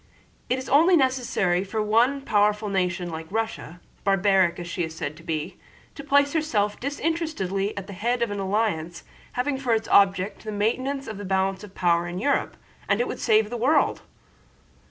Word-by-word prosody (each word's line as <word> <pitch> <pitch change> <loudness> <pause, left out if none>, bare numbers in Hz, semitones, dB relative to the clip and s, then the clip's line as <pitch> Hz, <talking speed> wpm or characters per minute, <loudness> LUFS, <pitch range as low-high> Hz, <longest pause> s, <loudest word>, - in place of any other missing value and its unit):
"It 255 - +1
is 260 - -6
only 335 +6 +5
necessary 245 - +1
for 205 +3 -4
one 230 +6 +2
powerful 210 -3 +1
nation 180 -2 -1
like 160 0 -6
Russia—barbaric 195 -3 0
as 175 - -6
she 175 +1 -2
is 160 -1 -5
said 150 -1 -4
to - - -13
be—to 165 - -7
place 285 0 +3
herself 220 -11 0
disinterestedly 280 - -2
at 200 - -4
the 200 - -9
head 235 +5 0
of 230 - -2
an 205 - -3
alliance 190 -4 -1 0.3
having 265 +2 -1
for 245 -4 +1
its 220 - -3
object 195 0 +3
the 215 - -5
maintenance 255 +7 -1
of 215 -3 -7
the - - -6
balance 190 0 0
of 200 -2 -12
power 175 -1 +2
of 175 +1 -5
Europe, 280 +8 0 0.3
and 200 - +2
it 245 - +1
would - - -5
save 220 -1 +2
the 240 - -3
world!" 265 +7 +2
210 Hz, 175 wpm, -25 LUFS, 190-250 Hz, 0.3 s, only